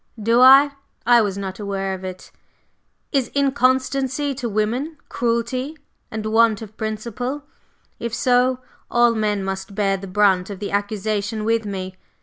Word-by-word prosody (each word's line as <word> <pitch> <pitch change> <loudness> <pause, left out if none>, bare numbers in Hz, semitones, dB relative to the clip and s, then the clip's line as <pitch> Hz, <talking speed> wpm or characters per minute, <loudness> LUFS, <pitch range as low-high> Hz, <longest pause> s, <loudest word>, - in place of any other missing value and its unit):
"Do 230 +3 +3
I? 270 +3 +8 0.3
I 240 0 +6
was 200 -2 -1
not 190 0 -5
aware 195 -2 -2
of 190 0 -7
it. 185 0 -8 0.8
Is 270 -5 +1
inconstancy 270 +1 +1
to 250 -3 -4
women 235 +9 -1
cruelty 240 +5 -1 0.3
and 220 0 -5
want 225 0 +3
of 215 0 -12
principle? 235 +6 -4 0.6
If 235 - -3
so, 250 +2 +2 0.3
all 240 -1 +4
men 210 -3 0
must 190 +1 -5
bear 195 -2 +1
the 195 +1 -8
brunt 190 -1 +2
of 200 - -6
the 200 +1 -5
accusation 205 +1 -2
with 225 -1 +1
me. 190 -1 -5
220 Hz, 145 wpm, -21 LUFS, 200-250 Hz, 0.8 s, I